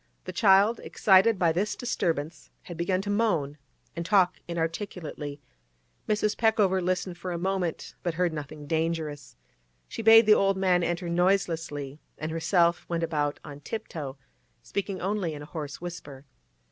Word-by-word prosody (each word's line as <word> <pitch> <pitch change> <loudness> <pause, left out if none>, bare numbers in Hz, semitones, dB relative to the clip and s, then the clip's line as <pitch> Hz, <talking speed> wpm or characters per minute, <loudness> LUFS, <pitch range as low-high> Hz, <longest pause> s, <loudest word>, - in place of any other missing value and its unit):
The - - -6
child, 205 +1 +4
excited 195 +2 +4
by 170 -3 +3
this 190 +6 -1
disturbance, 165 - -2
had 175 - -8
begun 185 +3 0
to 205 - -2
moan 170 -10 0 0.4
and 170 - -3
talk 185 -1 +3
inarticulately. 165 -3 -4 0.7
Mrs. 210 0 +1
Peckover 210 -4 +2
listened 180 0 -2
for 180 +1 -4
a 170 - -2
moment, 180 -2 -2
but 175 -2 -2
heard 175 -1 +1
nothing 150 0 -7
dangerous. 160 -2 -2 0.5
She - - -6
bade 225 +1 +8
the 215 - +7
old 195 -2 +2
man 185 -2 +3
enter 175 +1 -2
noiselessly, 165 -5 0 0.2
and 155 +1 -4
herself 170 +1 +2
went 170 -1 -1
about 150 -3 -1
on 145 -1 -9
tip 220 +9 -6
toe, 140 -4 -6 0.5
speaking 200 -1 -3
only 190 -4 -2
in 145 - -8
a 150 - -15
hoarse 150 -4 -5
whisper. 150 -6 -8
175 Hz, 155 wpm, -27 LUFS, 160-195 Hz, 0.7 s, bade